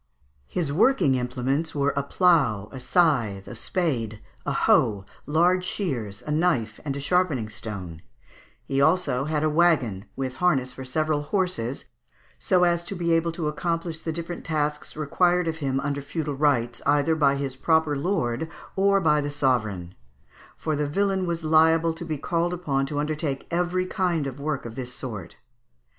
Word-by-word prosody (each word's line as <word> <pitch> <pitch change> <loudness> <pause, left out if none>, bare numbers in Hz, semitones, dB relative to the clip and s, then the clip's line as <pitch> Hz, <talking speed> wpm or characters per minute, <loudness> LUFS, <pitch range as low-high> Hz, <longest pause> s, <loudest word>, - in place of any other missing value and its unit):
] 70 0 -39
His 160 -6 -2
working 210 - +4
implements 130 +5 -1
were 140 0 +1
a 140 - +1
plough, 140 - +2
a 130 - -7
scythe, 125 - +1
a - - -7
spade, 115 - -1 0.3
a - - +1
hoe, 100 -3 +3 0.2
large 175 +4 +3
shears, 125 - -3
a 150 - -3
knife 150 -10 +1
and 140 -2 -3
a - - -3
sharpening 145 -7 +1
stone; 95 -7 -7 0.6
he 135 - -1
had - - +5
also 155 -5 +2
a 155 0 +1
waggon, 150 - +2
with 130 -1 -4
harness 135 -8 +2
for 130 - -8
several 155 +3 0
horses, 145 - -2 0.5
so 180 -1 +3
as 170 -1 +2
to 195 - -5
be 170 -2 +1
able 165 0 +2
to 165 -2 -3
accomplish 165 +1 -2
the 165 - -3
different 170 +1 -5
tasks 150 -1 -2
required 175 +3 +2
of 160 0 -2
him 135 -3 -1
under 140 0 -2
feudal 145 +1 -3
rights, 135 -5 +1
either 145 +2 +3
by 145 -3 +3
his 140 -2 -3
proper 160 +2 +2
lord, 140 -3 -1 0.3
or 195 +1 +4
by 150 -4 +3
the 145 - -3
sovereign; 110 -11 0 0.6
for 155 -1 -1
the 145 0 -1
villain 190 +2 0
was 170 -1 -2
liable 160 +1 +4
to 165 - -8
be 155 -2 -3
called 170 +4 -1
upon 140 -6 -1
to 145 - -4
undertake 150 -2 -2
every 180 +1 0
kind 180 -6 0
of 135 0 -5
work 145 -2 -2
of 115 - -6
this 125 0 -5
sort. 105 -9 -6
150 Hz, 170 wpm, -25 LUFS, 130-170 Hz, 0.6 s, had